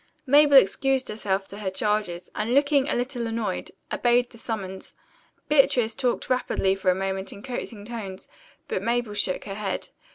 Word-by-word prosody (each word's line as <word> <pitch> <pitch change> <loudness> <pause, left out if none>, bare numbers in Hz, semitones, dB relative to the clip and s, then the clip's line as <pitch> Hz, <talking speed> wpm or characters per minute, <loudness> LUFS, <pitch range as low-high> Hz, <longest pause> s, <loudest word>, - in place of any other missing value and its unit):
Mabel 285 +1 +7
excused 265 +4 +3
herself 200 -2 -1
to 200 - -8
her 200 -3 -2
charges, 190 -3 -1
and 225 +4 -1
looking 285 0 +3
a - - +2
little 245 -1 -2
annoyed, 225 -1 -3 0.2
obeyed 240 0 +2
the 230 - -13
summons. 195 -5 -5 0.5
Beatrice 260 -6 +3
talked 250 -3 -1
rapidly 250 -6 +1
for 195 -1 0
a 180 - +4
moment 190 0 -3
in 200 - -11
coaxing 235 -5 -6
tones, 210 -5 -7 0.4
but - - -2
Mabel 235 0 -1
shook 205 -3 0
her 195 - -5
head. 195 -1 -3
220 Hz, 165 wpm, -25 LUFS, 195-250 Hz, 0.5 s, Mabel